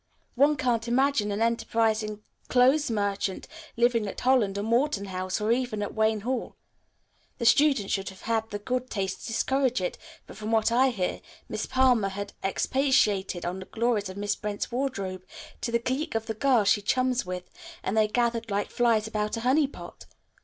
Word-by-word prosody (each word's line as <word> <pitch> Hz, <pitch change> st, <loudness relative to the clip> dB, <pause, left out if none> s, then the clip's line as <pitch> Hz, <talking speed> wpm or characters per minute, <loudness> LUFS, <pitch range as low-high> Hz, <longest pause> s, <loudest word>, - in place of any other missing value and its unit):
One 285 Hz, +4 st, +4 dB
can't 240 Hz, -3 st, 0 dB
imagine 245 Hz, -3 st, +2 dB
an 205 Hz, +3 st, 0 dB
enterprising 220 Hz, -2 st, 0 dB, 0.2 s
clothes 260 Hz, +4 st, +4 dB
merchant 200 Hz, -3 st, -2 dB, 0.3 s
living 235 Hz, -2 st, +2 dB
at 195 Hz, -, -6 dB
Holland 240 Hz, -6 st, +2 dB
or 200 Hz, -, -2 dB
Morton 235 Hz, -1 st, +1 dB
House 185 Hz, 0 st, -3 dB
or 215 Hz, +1 st, 0 dB
even 235 Hz, -4 st, 0 dB
at -, -, -5 dB
Wayne 220 Hz, -1 st, +1 dB
Hall. 250 Hz, +2 st, -3 dB, 0.8 s
The 235 Hz, -, -3 dB
students 270 Hz, -4 st, +4 dB
should 195 Hz, -1 st, -1 dB
have 190 Hz, -1 st, -14 dB
had 225 Hz, 0 st, -1 dB
the 205 Hz, -, -3 dB
good 255 Hz, +4 st, -3 dB
taste 190 Hz, -2 st, -3 dB
to -, -, -7 dB
discourage 260 Hz, +2 st, +1 dB
it, 180 Hz, -, -3 dB, 0.3 s
but, -, -, -12 dB
from 215 Hz, +1 st, -4 dB
what 225 Hz, 0 st, +3 dB
I 260 Hz, +3 st, +4 dB
hear, 190 Hz, -7 st, -2 dB, 0.3 s
Miss -, -, -4 dB
Palmer 250 Hz, -6 st, +3 dB
had 200 Hz, +1 st, -6 dB
expatiated 200 Hz, -5 st, +1 dB
on 180 Hz, +2 st, -3 dB
the 190 Hz, -, -8 dB
glories 225 Hz, -3 st, -1 dB
of 185 Hz, -, -8 dB
Miss 205 Hz, 0 st, -1 dB
Brent's 210 Hz, +2 st, -4 dB
wardrobe 200 Hz, -8 st, -3 dB, 0.4 s
to 235 Hz, -, -2 dB
the 235 Hz, -, +3 dB
clique 260 Hz, +5 st, -3 dB
of 225 Hz, 0 st, -1 dB
girls 245 Hz, -7 st, +3 dB
she 205 Hz, -, +3 dB
chums 255 Hz, +4 st, +1 dB
with, 180 Hz, 0 st, -6 dB, 0.3 s
and 195 Hz, -, -1 dB
they 215 Hz, -1 st, +4 dB
gathered 230 Hz, 0 st, 0 dB
like 205 Hz, 0 st, -1 dB
flies 230 Hz, -3 st, +2 dB
about 215 Hz, 0 st, -2 dB
a -, -, -4 dB
honey 270 Hz, +5 st, +3 dB
pot. -, -, -11 dB
225 Hz, 180 wpm, -27 LUFS, 205-250 Hz, 0.8 s, One